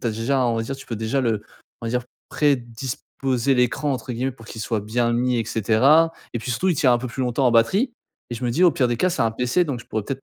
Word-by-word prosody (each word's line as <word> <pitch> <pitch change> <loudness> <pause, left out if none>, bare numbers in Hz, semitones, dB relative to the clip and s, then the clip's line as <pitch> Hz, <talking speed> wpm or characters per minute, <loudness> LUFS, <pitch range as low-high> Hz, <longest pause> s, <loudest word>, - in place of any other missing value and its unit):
tu - - -3
as - - +1
déjà, 125 +4 0
on 115 -1 +1
va 115 - 0
dire, 135 +4 -4
tu 135 - -12
peux 115 - -4
déjà 115 +5 -1
le 110 -4 0 0.4
on - - -3
va - - -2
dire, 125 0 0 0.3
«prédisposer» 130 -1 -1
l'écran, 125 +4 +1
entre 125 0 -4
guillemets, 130 +3 -1
pour 115 -3 -16
qu'il 110 - -8
soit 110 -2 -1
bien 120 +3 0
mis 125 0 +1
et 115 - -1
cetera 130 +10 +4 0.2
et - - 0
puis, 125 - -4
surtout, 150 +11 0
il 175 - +3
tiens 130 -3 +4
un 120 - +1
peu 125 - -5
plus 130 - -6
longtemps 125 +1 +1
en - - +4
batterie 195 - +3 0.4
et - - -3
je 120 - -5
me - - 0
dis, 170 +10 +3
au 175 - +7
pire 125 -3 +1
des 120 - 0
cas, 185 - +2
c'est 140 - -3
un 115 - +2
pc, 125 +10 +1
donc 135 -6 -4
je - - -14
pourrais, 110 -1 -2
peut-être, 135 +2 -5
125 Hz, 295 wpm, -23 LUFS, 115-135 Hz, 0.4 s, au